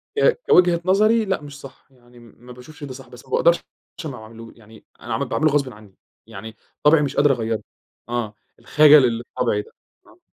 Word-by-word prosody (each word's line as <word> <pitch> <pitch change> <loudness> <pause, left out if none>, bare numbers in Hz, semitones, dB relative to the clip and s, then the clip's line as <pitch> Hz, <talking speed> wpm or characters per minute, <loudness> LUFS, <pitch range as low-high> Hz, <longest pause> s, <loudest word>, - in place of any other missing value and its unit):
ك 475 +2 +2
كوجهة 175 -1 +4
نظري، 215 +4 +3
لأ، 190 -5 -2
مش 145 -1 -11
صح، 135 -2 -14
يعني 120 -1 -21
م 120 -1 -18
ما 125 - -12
باشوفِش 135 +5 -14
ده 135 -2 -7
صح، 130 0 -12
بس 125 +1 -14
ما 130 - -20
باقدَرش 170 +5 +3 0.5
ما 135 -4 -6
أعمَلهوش 115 +1 -13
يعني 110 -1 -18
أنا - - -6
عمل - - -1
باعمله 155 -1 +1
غصبًا 140 -4 -1
عنِّي، 105 -2 -17 0.3
يعني 110 +3 -10 0.3
طَبعي 150 +1 +5
مش 140 -1 -3
قادِر 145 -1 +4
أغيِّره. 115 -3 -2 0.5
آه، 120 -3 -3 0.3
الخجَل 150 -3 +6
اللي 120 0 -2
في - - -47
طَبعي 110 -4 0
ده. - - -18 0.4
آه. - - -22
130 Hz, 205 wpm, -21 LUFS, 115-150 Hz, 0.5 s, الخجَل